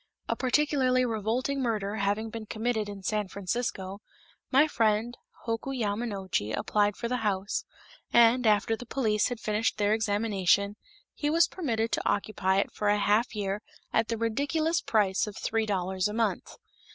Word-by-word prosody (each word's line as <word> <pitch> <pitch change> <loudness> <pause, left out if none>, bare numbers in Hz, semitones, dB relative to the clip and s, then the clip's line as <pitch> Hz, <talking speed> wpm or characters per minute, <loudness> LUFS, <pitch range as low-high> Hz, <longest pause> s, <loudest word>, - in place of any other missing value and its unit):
A - - 0
particularly 260 -1 +2
revolting 240 +5 -1
murder 215 -4 -1
having 205 +2 -1
been 225 -1 -7
committed 220 -1 -1
in 200 -1 -8
San 210 0 -1
Francisco, 195 0 -3 0.5
my 280 +4 +5
friend 225 -2 +1 0.3
Hoku 235 +4 -2
Yamanochi 200 - -2
applied 205 -1 +1
for 235 - -3
the 250 +1 -1
house, 205 -3 -1 0.5
and, 235 +1 +5
after 215 +1 +3
the 245 +1 -10
police 220 -5 +1
had 245 -2 -4
finished 215 0 0
their 205 0 +2
examination, 205 -2 +1 0.4
he 295 - -1
was 330 +2 +4
permitted 230 -10 -2
to - - 0
occupy 195 -2 0
it 195 - +1
for 210 - -1
a 205 - +4
half 210 +3 +2
year 200 0 -2 0.3
at 225 - +2
the 230 - -2
ridiculous 285 +9 0
price 205 -2 +1
of 210 - -7
three 225 -1 -1
dollars 190 -1 0
a 210 - -5
month. 230 0 -1
220 Hz, 160 wpm, -28 LUFS, 205-240 Hz, 0.5 s, my